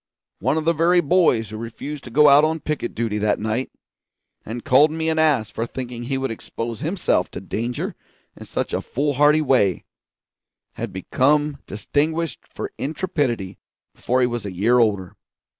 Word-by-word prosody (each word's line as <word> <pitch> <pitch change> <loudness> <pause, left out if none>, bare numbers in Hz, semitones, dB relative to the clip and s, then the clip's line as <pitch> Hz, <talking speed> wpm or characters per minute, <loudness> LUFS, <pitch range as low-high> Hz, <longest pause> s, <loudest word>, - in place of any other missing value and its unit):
One 155 - +1
of 155 - -2
the 165 - +3
very 170 +3 +3
boys 150 - +2
who 110 - -6
refused 120 +6 -7
to - - -8
go 150 +5 +5
out 145 +1 +7
on 160 +1 +1
picket 150 -6 -3
duty 110 -2 -1
that 105 0 +1
night, 110 +4 -2 0.7
and 115 +2 -7
called 140 +5 +6
me 160 +1 -2
an 160 0 +1
ass 145 -9 +2
for 115 - -3
thinking 120 -2 -6
he 135 +2 -1
would 135 -2 -2
expose 115 0 -5
himself 165 - 0
to - - -7
danger 115 +6 -3 0.4
in - - -11
such - - -3
a - - 0
foolhardy 145 +2 +2
way, 115 - +2 0.9
had - - -5
become 145 +9 +1
distinguished 155 - -2
for - - -5
intrepidity 140 - -2 0.3
before 130 +1 0
he - - +5
was 120 -2 -3
a 100 - -5
year 110 +7 +3
older. 100 -6 +1
130 Hz, 170 wpm, -22 LUFS, 115-150 Hz, 0.9 s, out